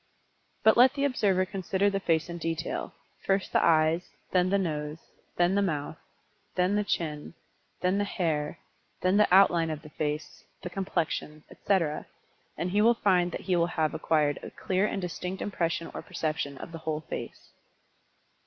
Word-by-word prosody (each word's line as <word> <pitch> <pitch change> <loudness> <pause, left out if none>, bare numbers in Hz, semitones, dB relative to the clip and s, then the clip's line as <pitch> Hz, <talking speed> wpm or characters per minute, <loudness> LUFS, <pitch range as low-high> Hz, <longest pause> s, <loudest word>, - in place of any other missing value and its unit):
But 220 - +6
let 255 +3 +6
the 280 - -1
observer 200 -8 +2
consider 190 +1 0
the 200 -1 +1
face 165 -4 +1
in 170 0 -6
detail, 165 -1 -3 0.3
first 195 0 0
the - - +4
eyes, 160 +2 +3 0.2
then 180 0 +3
the 200 - +3
nose, 150 -4 -2 0.4
then 175 +1 +3
the 200 - +3
mouth, 155 -5 -2 0.6
then 180 +2 +2
the 210 - +2
chin, 155 -5 -3 0.5
then 185 +2 +2
the - - +2
hair, 160 -7 -1 0.4
then 185 +2 +3
the 210 - +4
outline 175 -3 +5
of 155 -1 -5
the 150 - -12
face, 150 0 -4 0.2
the 180 - -5
complexion, 170 -5 -2
etc., 165 -7 0 0.5
and 180 - -2
he 205 +2 +3
will 235 +2 +5
find 180 -5 +2
that - - -5
he 185 - 0
will 170 -1 +3
have 160 -3 0
acquired 150 -2 +1
a - - -7
clear 190 +2 0
and 195 - -3
distinct 180 +2 -4
impression 170 -4 -2
or - - -5
perception 155 -5 -3
of 170 - -8
the 165 - -7
whole 155 -1 -3
face. - - -7
175 Hz, 170 wpm, -28 LUFS, 155-195 Hz, 0.6 s, But